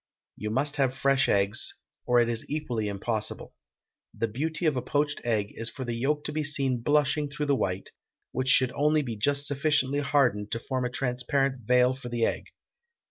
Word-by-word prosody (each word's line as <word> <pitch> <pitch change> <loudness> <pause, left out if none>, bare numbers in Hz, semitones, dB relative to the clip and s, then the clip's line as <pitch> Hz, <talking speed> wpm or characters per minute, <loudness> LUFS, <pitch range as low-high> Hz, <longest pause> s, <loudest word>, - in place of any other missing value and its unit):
You 105 - -4
must 140 +6 -1
have 135 -2 +1
fresh 135 0 +2
eggs, 100 0 +1 0.3
or 125 0 +4
it 120 - +3
is 115 -1 -2
equally 125 -8 -2
impossible. 105 +2 -2 0.6
The 115 - 0
beauty 155 +9 -3
of 155 -3 +3
a 125 - -1
poached 145 +2 -1
egg 110 -4 0
is 115 0 +1
for 130 - -6
the 120 - -3
yolk 145 +5 0
to - - -3
be 155 0 -1
seen 135 -4 0
blushing 145 +2 +2
through 150 +1 -3
the 140 -1 +2
white, 95 -6 -2 0.4
which 130 +1 -1
should 130 -1 +5
only 150 +2 +2
be 120 -4 -4
just 140 +6 +1
sufficiently 145 -1 +1
hardened 130 -8 +1
to 115 - -2
form 130 +1 -2
a - - -1
transparent 125 0 -1
veil 125 0 +4
for 130 -2 -8
the 120 -1 +1
egg. - - -2
130 Hz, 190 wpm, -27 LUFS, 115-145 Hz, 0.6 s, should